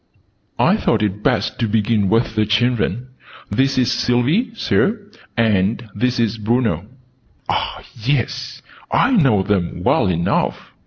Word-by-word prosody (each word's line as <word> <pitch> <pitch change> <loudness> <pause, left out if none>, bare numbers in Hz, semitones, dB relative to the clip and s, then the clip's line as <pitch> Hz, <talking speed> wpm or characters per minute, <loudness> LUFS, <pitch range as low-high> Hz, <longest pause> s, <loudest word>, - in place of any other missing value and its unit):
I - - +3
thought - - +1
it 105 0 -2
best - - 0
to 115 - +1
begin 105 -2 +1
with 115 +1 +1
the 110 -1 +1
children. 120 +2 0 0.4
"This 135 +6 +1
is 125 -1 +2
Sylvie. 125 - +1
Sir; 215 -1 +1 0.4
and 110 0 +1
this 125 +3 -1
is 115 -1 0
Bruno." 110 -5 0 0.6
"Ah, - - -2
yes! 120 +2 -2 0.3
I - - +3
know 135 - +3
them 90 -3 -1
well 100 - +2
enough!" 85 -1 -1
115 Hz, 135 wpm, -19 LUFS, 105-125 Hz, 0.6 s, I